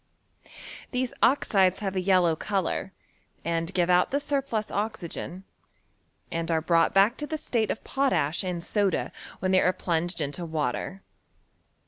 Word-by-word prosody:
These 250 -1 -2
oxides 195 -8 +4
have 195 -2 -3
a 185 - +1
yellow 180 -3 +3
colour, 195 +1 -2 0.5
and 165 +1 -1
give 175 -2 +1
out 180 0 +4
the 280 - +1
surplus 275 -7 -2
oxygen, 195 -3 -4 0.9
and 165 0 -2
are 165 -1 +2
brought 165 +1 +3
back 200 +6 +4
to 295 - -4
the 315 - -2
state 230 -7 0
of - - -3
potash 260 - +1
and 180 -2 -3
soda 200 -2 0 0.3
when 185 +1 +1
they 185 - +5
are 180 - +4
plunged 175 0 -1
into 150 +3 -3
water. 160 +4 -3
185 Hz, 145 wpm, -27 LUFS, 170-215 Hz, 0.9 s, they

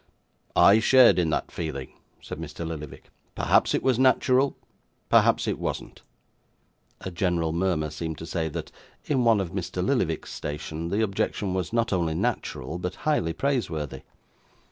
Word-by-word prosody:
'I 100 +3 +7
shared 125 -2 +6
in 85 -3 +1
that - - -2
feeling,' 75 -6 -5 0.3
said - - -7
Mr. 85 - -6
Lillyvick: 75 -3 -8 0.2
'perhaps - - +3
it - - -1
was 130 -2 +2
natural; 130 +1 +3 0.5
perhaps - - +4
it - - -1
wasn't.' - - -5 1.0
A 95 - -5
gentle 85 -2 0
murmur 85 -4 0
seemed 80 0 -5
to 80 - -7
say, 80 -1 -2
that, - - -6 0.3
in 135 -4 +1
one 115 -3 +5
of 90 -4 -3
Mr. 90 -1 -3
Lillyvick's 95 - 0
station, 80 +2 -5
the 105 +5 +1
objection 100 -1 -1
was 95 -3 -2
not 115 -2 +1
only 85 -3 0
natural, 80 +3 -2
but 90 +1 -4
highly 150 - +1
praiseworthy. 95 - -2
90 Hz, 150 wpm, -26 LUFS, 80-110 Hz, 1.0 s, I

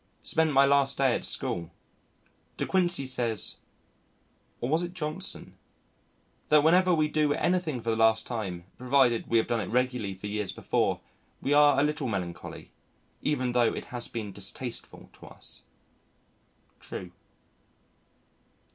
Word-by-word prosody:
Spent 160 -1 +2
my 135 0 +6
last 140 -1 +3
day 135 -3 +3
at - - -2
school. 85 -1 -1 0.9
De - - -1
Quincey 175 -6 +2
says 120 -4 0 1.0
(or 120 - -2
was 160 +5 +2
it 175 +1 -5
Johnson?) 155 -4 -4 0.9
that 150 -1 +6
whenever 180 +3 +5
we 155 -3 +3
do 150 -1 +1
anything 175 -7 0
for 115 - -1
the - - +1
last 110 0 +3
time, 95 -8 -4
provided 125 -2 +3
we 115 - +2
have 110 - +3
done 115 -2 -1
it 100 - -4
regularly 125 -5 0
for 95 - -10
years 105 -1 -2
before, - - 0 0.4
we 140 - 0
are 145 -1 +6
a - - +4
little 150 -2 -1
melancholy, 90 -6 -5 0.5
even 130 -4 0
though 120 -1 +2
it - - -5
has 120 -1 -1
been 110 -3 -5
distasteful 105 +5 -5
to - - -14
us.... - - -8 1.2
True. 90 -1 -7
125 Hz, 145 wpm, -28 LUFS, 110-150 Hz, 1.2 s, my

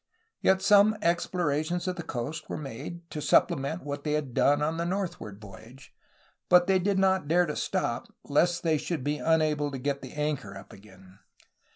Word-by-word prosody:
Yet 190 0 +3
some 205 +2 +5
explorations 170 0 0
of 185 - -1
the 175 - -5
coast 145 0 -5
were - - -3
made, 155 +5 -8
to 150 - -4
supplement 140 +4 +2
what 145 0 -5
they 150 - -1
had 145 -5 -2
done 145 +4 +3
on 160 +2 -1
the 170 - -1
northward 175 - -4
voyage, 110 +6 -14 0.6
but 180 0 +6
they 190 0 +3
did 195 +2 0
not 190 -4 +2
dare 175 +3 +3
to - - -4
stop, - - -2
lest 170 +4 +1
they 160 -3 +2
should 160 -5 -3
be 150 +2 -1
unable 155 -2 +1
to 135 - -5
get 140 +2 -2
the 130 - -9
anchor 150 -10 -3
up 95 - -13
again. 95 -1 -17
155 Hz, 185 wpm, -28 LUFS, 135-175 Hz, 0.6 s, but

